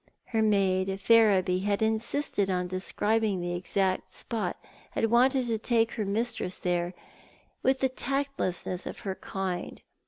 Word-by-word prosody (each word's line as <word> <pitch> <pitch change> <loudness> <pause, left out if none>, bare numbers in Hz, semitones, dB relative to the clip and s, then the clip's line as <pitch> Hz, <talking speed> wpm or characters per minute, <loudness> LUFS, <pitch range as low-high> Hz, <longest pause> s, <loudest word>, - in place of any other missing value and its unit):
Her 225 - +3
maid, 195 -2 +2
Ferriby, 195 -4 +4
had 200 +2 0
insisted 220 -1 0
on 180 -1 0
describing 205 +3 0
the 175 0 -2
exact 185 +1 0
spot, 210 -7 -3 0.4
had 225 - 0
wanted 255 +2 +4
to 225 -2 -1
take 225 0 +2
her 215 -3 -3
mistress 200 -2 -1
there, 175 0 -1 0.7
with 265 0 +2
the 265 - +3
tactlessness 260 -9 -2
of - - -7
her 195 - -3
kind. 190 -2 -4
205 Hz, 135 wpm, -28 LUFS, 185-230 Hz, 0.7 s, Ferriby